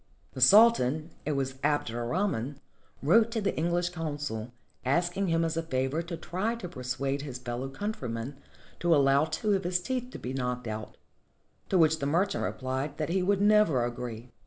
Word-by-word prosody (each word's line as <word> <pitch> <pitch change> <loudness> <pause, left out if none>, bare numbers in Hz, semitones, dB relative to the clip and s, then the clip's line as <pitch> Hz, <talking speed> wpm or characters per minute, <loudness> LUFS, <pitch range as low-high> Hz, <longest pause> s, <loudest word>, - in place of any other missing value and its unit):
The 130 - -7
Sultan 160 - +6
— - - -31
it 150 - +1
was 135 -1 -2
Abd 145 -5 +1
er 120 +1 -3
Rahman 145 - -1 0.2
— - - -25
wrote 220 +10 +5
to 230 -1 -2
the 200 -2 -1
English 175 +2 0
consul, 145 -9 -4 0.3
asking 175 +8 +1
him 165 -1 +2
as 165 0 -1
a 165 - 0
favor 135 0 -1
to 170 0 -6
try 190 +7 -2
to 230 -6 -6
persuade 135 -1 -3
his 140 -4 -6
fellow 125 +1 -4
countryman 135 - -4 0.4
to 170 -1 +4
allow 140 +1 +4
two 180 +7 0
of 195 - 0
his 180 +1 +1
teeth 250 +5 -3
to - - -8
be 125 - -5
knocked 125 -1 -2
out, 110 -1 -6 0.7
to 190 - +3
which 160 -1 +4
the 140 - -1
mer 170 +7 +3
chant 200 - -3
replied 130 +3 -3
that 155 - -2
he 185 +2 +1
would 195 +2 +2
never 205 - +4
agree. 120 0 -6
150 Hz, 195 wpm, -29 LUFS, 130-180 Hz, 0.7 s, Sultan